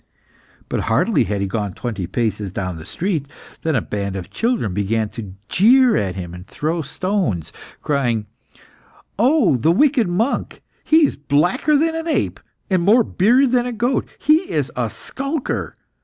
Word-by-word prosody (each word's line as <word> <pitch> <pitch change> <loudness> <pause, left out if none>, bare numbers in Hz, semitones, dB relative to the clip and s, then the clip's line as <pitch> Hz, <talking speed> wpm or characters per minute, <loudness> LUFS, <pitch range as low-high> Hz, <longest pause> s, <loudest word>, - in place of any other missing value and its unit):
But - - -2
hardly - - +2
had 100 +1 -2
he 100 - 0
gone 100 -1 -3
twenty 105 -8 -4
paces 105 -1 -2
down 90 -2 -4
the 80 - -10
street, 170 -6 -2 0.3
than 160 -2 0
a 120 - +1
band 100 -2 -3
of 95 -3 -6
children 225 - -1
began 105 +2 0
to 105 -5 -8
jeer 245 +4 +5
at 95 -2 -1
him, 90 -2 -6
and 90 +2 -10
throw 160 +3 -2
stones, 165 - -2 0.3
crying 120 -7 0 0.9
"Oh, 245 - +4
the 155 +8 +3
wicked 265 - +3
monk! 220 +10 -1 0.2
He 315 0 +5
is - - -2
blacker 155 - +2
than 320 +2 +1
an 325 +1 -4
ape, 325 - 0 0.3
and 185 -3 +1
more 215 +7 +5
bearded 240 +8 +3
than 250 -1 +2
a - - -3
goat! 240 +3 0
He 315 +6 +2
is - - -1
a - - -1
skulker! 275 +1 -4
165 Hz, 165 wpm, -20 LUFS, -, 0.9 s, jeer